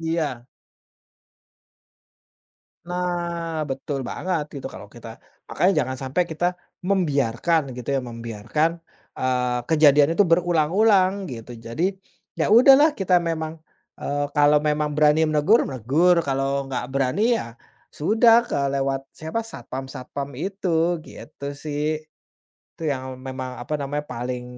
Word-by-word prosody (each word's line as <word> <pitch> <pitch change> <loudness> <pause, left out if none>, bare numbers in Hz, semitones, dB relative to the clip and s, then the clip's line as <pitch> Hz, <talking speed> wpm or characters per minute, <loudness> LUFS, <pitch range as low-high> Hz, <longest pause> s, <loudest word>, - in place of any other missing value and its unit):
Iya. 155 -7 -2 2.4
Nah, 170 -2 -2
betul 135 +1 -3
banget 180 -4 -2
itu - - -8
kalau 105 - -10
kita 120 0 -12 0.4
makanya 185 +2 +2
jangan 130 0 -5
sampai 135 +7 0
kita 160 +3 -1 0.4
membiarkan 160 - +1 0.2
gitu 125 - -6
ya, 135 - 0
membiarkan, 115 +5 -2 0.5
eee, 125 -1 0
kejadian 150 -2 +5
itu 205 - +6
berulang-ulang 180 +4 +3 0.2
gitu. 120 0 -8
Jadi, 170 +12 -1 0.5
ya - - +1
udahlah 270 +7 +7
kita 180 -2 +3
memang 160 -1 -3 0.4
eee, 145 0 -1
kalau 145 0 +5
memang 150 0 +1
berani 150 +1 +4
menegur, 155 +10 +4
menegur. 140 +8 +2
Kalau 135 0 -1
nggak 130 -2 -3
berani 135 +7 0 0.2
ya 115 - -7 0.4
sudah 225 +8 +5
ke - - -1 0.2
lewat 135 0 -1
siapa? 220 +9 -4
Satpam-satpam 135 - -7
itu, 175 -3 0
gitu 140 -1 -8
sih. 150 +1 -3 0.7
Itu - - -13
yang 130 -2 -4
memang, 130 -1 -6
apa 135 +5 -4
namanya, 145 +1 -4
paling 125 +1 -4
150 Hz, 120 wpm, -23 LUFS, 130-170 Hz, 2.4 s, udahlah